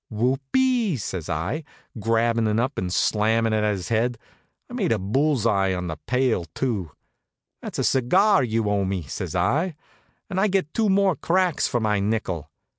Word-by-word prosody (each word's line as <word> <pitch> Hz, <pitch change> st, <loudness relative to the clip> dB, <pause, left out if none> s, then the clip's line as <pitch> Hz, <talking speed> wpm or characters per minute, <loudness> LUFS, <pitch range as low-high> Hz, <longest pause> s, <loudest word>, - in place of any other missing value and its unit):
"Whoop 125 Hz, +5 st, 0 dB
ee!" 250 Hz, -, +2 dB
says 90 Hz, -6 st, -5 dB
I, 95 Hz, -, -2 dB, 0.4 s
grabbin' 115 Hz, +1 st, +1 dB
it 105 Hz, +1 st, +1 dB
up 130 Hz, +4 st, -1 dB
and 90 Hz, -1 st, -3 dB
slammin' 110 Hz, +3 st, +2 dB
it -, -, +2 dB
at 105 Hz, -, +2 dB
his 95 Hz, +1 st, -6 dB
head. 115 Hz, +1 st, +1 dB, 0.5 s
I -, -, -12 dB
made 210 Hz, -9 st, 0 dB
a 115 Hz, -, +3 dB
bull's 125 Hz, +6 st, 0 dB
eye 95 Hz, -4 st, +2 dB
on 90 Hz, 0 st, -4 dB
the 80 Hz, -3 st, -4 dB
pail, 125 Hz, -8 st, +1 dB
too. 110 Hz, -11 st, -2 dB, 0.7 s
"That's -, -, -6 dB
a -, -, 0 dB
cigar 185 Hz, -, +3 dB
you 115 Hz, -2 st, 0 dB
owe 100 Hz, -1 st, +1 dB
me," 95 Hz, -2 st, -2 dB
says 70 Hz, -, -5 dB
I, 160 Hz, +6 st, +1 dB, 0.5 s
"and 190 Hz, -2 st, -2 dB
I 205 Hz, -, +3 dB
gets 190 Hz, -6 st, 0 dB
two 220 Hz, -2 st, +1 dB
more 195 Hz, -2 st, +3 dB
cracks 180 Hz, +3 st, +1 dB
for 120 Hz, -, 0 dB
my 105 Hz, -2 st, +1 dB
nickel." 100 Hz, -7 st, -2 dB
115 Hz, 185 wpm, -24 LUFS, 105-160 Hz, 0.7 s, a